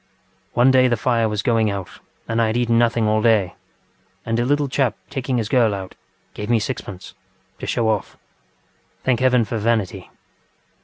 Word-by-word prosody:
One 125 Hz, +2 st, +4 dB
day 130 Hz, -1 st, +5 dB
the 120 Hz, -2 st, +1 dB
fire 115 Hz, -1 st, +1 dB
was 105 Hz, -1 st, -2 dB
going 115 Hz, -2 st, +2 dB
out 100 Hz, -2 st, -6 dB, 0.3 s
and 115 Hz, 0 st, 0 dB
I 115 Hz, -, +3 dB
had 110 Hz, +2 st, -1 dB
eaten 115 Hz, -1 st, +2 dB
nothing 115 Hz, -2 st, +2 dB
all 110 Hz, 0 st, +2 dB
day, 110 Hz, -5 st, +2 dB, 0.7 s
and 115 Hz, +1 st, -1 dB
a 120 Hz, -, +1 dB
little 145 Hz, +2 st, +1 dB
chap 130 Hz, -5 st, 0 dB
taking 130 Hz, -2 st, -2 dB
his 110 Hz, -3 st, -1 dB
girl 115 Hz, -4 st, +2 dB
out, 95 Hz, -1 st, -7 dB, 0.4 s
gave 105 Hz, +1 st, -6 dB
me 120 Hz, -1 st, +3 dB
sixpenceŌĆöto 100 Hz, -6 st, -6 dB, 0.5 s
show 115 Hz, -2 st, 0 dB
off. 110 Hz, -3 st, -2 dB, 0.9 s
Thank 125 Hz, -3 st, +1 dB
heaven 125 Hz, -3 st, +3 dB
for 110 Hz, +2 st, -3 dB
vanity! 110 Hz, -3 st, -1 dB
115 Hz, 170 wpm, -21 LUFS, 110-125 Hz, 0.9 s, day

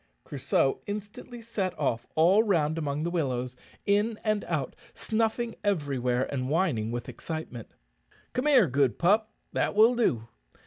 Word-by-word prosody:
Crusoe 135 Hz, -1 st, 0 dB
instantly 210 Hz, +4 st, -7 dB
set 210 Hz, -5 st, -3 dB
off 120 Hz, -6 st, -1 dB
all 180 Hz, +7 st, +5 dB
round 165 Hz, -7 st, +1 dB
among 145 Hz, -1 st, -2 dB
the 170 Hz, -, -1 dB
willows, 130 Hz, -7 st, -2 dB, 0.3 s
in 210 Hz, +2 st, +1 dB
and 215 Hz, -1 st, 0 dB
out, -, -, -2 dB, 0.2 s
snuffing 225 Hz, +1 st, -1 dB
everywhere, 135 Hz, -10 st, 0 dB
and 130 Hz, -1 st, -2 dB
whining 145 Hz, -, +1 dB
with 120 Hz, 0 st, -4 dB
excitement. 155 Hz, -8 st, -6 dB, 0.6 s
"Come 250 Hz, +4 st, -1 dB
here, 265 Hz, -8 st, +6 dB
good 140 Hz, -3 st, +1 dB
pup; 215 Hz, +5 st, +2 dB, 0.2 s
that -, -, 0 dB
will 220 Hz, +3 st, +6 dB
do. 120 Hz, -, +1 dB
170 Hz, 140 wpm, -28 LUFS, 135-215 Hz, 0.6 s, here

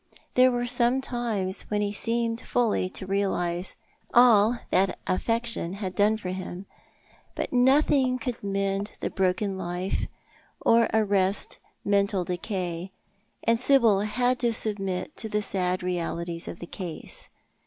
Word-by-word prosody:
There 255 Hz, 0 st, +5 dB
were 245 Hz, 0 st, -1 dB
times 240 Hz, -5 st, 0 dB
when 210 Hz, 0 st, 0 dB
he 205 Hz, 0 st, -1 dB
seemed 230 Hz, +1 st, 0 dB
fully 225 Hz, -6 st, 0 dB
to 190 Hz, -, -4 dB
realise 190 Hz, -2 st, -1 dB, 0.4 s
all 235 Hz, -1 st, +6 dB
that 190 Hz, +1 st, +2 dB
affection 230 Hz, -2 st, 0 dB
had 195 Hz, -2 st, -4 dB
done 210 Hz, +2 st, +3 dB
for 190 Hz, -4 st, -6 dB
him; 185 Hz, 0 st, -6 dB, 0.7 s
but -, -, -3 dB
nothing 260 Hz, 0 st, +3 dB
could 245 Hz, -2 st, -5 dB
mend 195 Hz, +1 st, -1 dB
the -, -, -3 dB
broken 190 Hz, +1 st, 0 dB
life, 180 Hz, +1 st, -2 dB, 0.5 s
or 230 Hz, 0 st, +4 dB
arrest 200 Hz, -3 st, +1 dB, 0.3 s
mental 200 Hz, -2 st, +2 dB
decay, 180 Hz, 0 st, -4 dB, 0.5 s
and 230 Hz, 0 st, +2 dB
Sibyl 235 Hz, -6 st, +5 dB
had 245 Hz, +4 st, 0 dB
to 240 Hz, -2 st, +1 dB
submit 195 Hz, +1 st, -1 dB
to 220 Hz, -, -4 dB
the 210 Hz, 0 st, 0 dB
sad 185 Hz, -2 st, -1 dB
realities 170 Hz, -1 st, -3 dB
of -, -, -6 dB
the 175 Hz, -, -8 dB
case. 170 Hz, -2 st, -2 dB
205 Hz, 130 wpm, -26 LUFS, 185-235 Hz, 0.7 s, all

